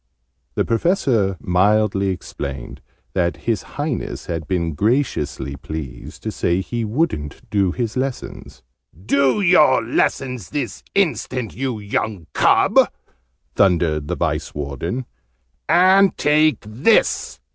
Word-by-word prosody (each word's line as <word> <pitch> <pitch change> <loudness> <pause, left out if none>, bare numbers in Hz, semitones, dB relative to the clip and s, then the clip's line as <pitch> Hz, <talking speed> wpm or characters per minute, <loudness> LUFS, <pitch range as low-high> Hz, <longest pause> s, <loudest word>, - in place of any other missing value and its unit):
The - - +1
Professor 115 - +1
mildly 100 +1 +2
explained 70 -8 -5 0.3
that 85 -2 0
His 115 -5 0 0.2
Highness 145 -3 -3
had 80 -2 -4
been 85 -3 -1
graciously 100 - -1
pleased 75 -1 -8
to - - -2
say 85 +2 0
he 115 +4 -3
wouldn't 110 - -2
do 100 -3 +2
his 115 +1 -3
lessons. 130 - -5 0.4
"Do 140 - +2
your 170 -9 +5
lessons 125 -1 -1
this 140 -5 -4
instant, 130 - 0
you 130 -3 -3
young 100 -3 -3
cub!" - - +4 0.7
thundered 85 -6 +2
the - - -2
Vice - - -2
Warden. 75 - -4 0.6
"And 185 +4 +5
take 155 +1 +3
this!" 120 - +1
110 Hz, 115 wpm, -20 LUFS, 85-135 Hz, 0.7 s, your